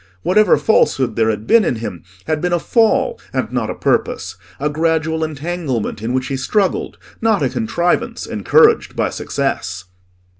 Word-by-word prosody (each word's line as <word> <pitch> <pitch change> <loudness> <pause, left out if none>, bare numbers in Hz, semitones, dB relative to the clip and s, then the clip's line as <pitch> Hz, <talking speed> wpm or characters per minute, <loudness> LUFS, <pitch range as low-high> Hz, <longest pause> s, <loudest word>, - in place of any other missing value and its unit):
Whatever 210 +1 +4
falsehood 130 - +2
there 110 -1 +2
had 105 0 -2
been 230 - +5
in 130 - 0
him, 110 -7 -6 0.2
had 155 -1 -1
been 180 0 0
a - - +4
fall 235 - +1
and - - -2
not - - -1
a - - -3
purpose; - - -1 0.2
a - - 0
gradual 160 +1 0
entanglement 155 -8 -3
in 115 +2 -2
which 130 0 0
he 135 - -3
struggled, 195 +8 -1 0.2
not 220 -8 +2
a 130 - +2
contrivance 130 +8 -1
encouraged 455 -1 +3
by - - 0
success. 95 -9 -3
155 Hz, 160 wpm, -18 LUFS, 125-180 Hz, 0.2 s, been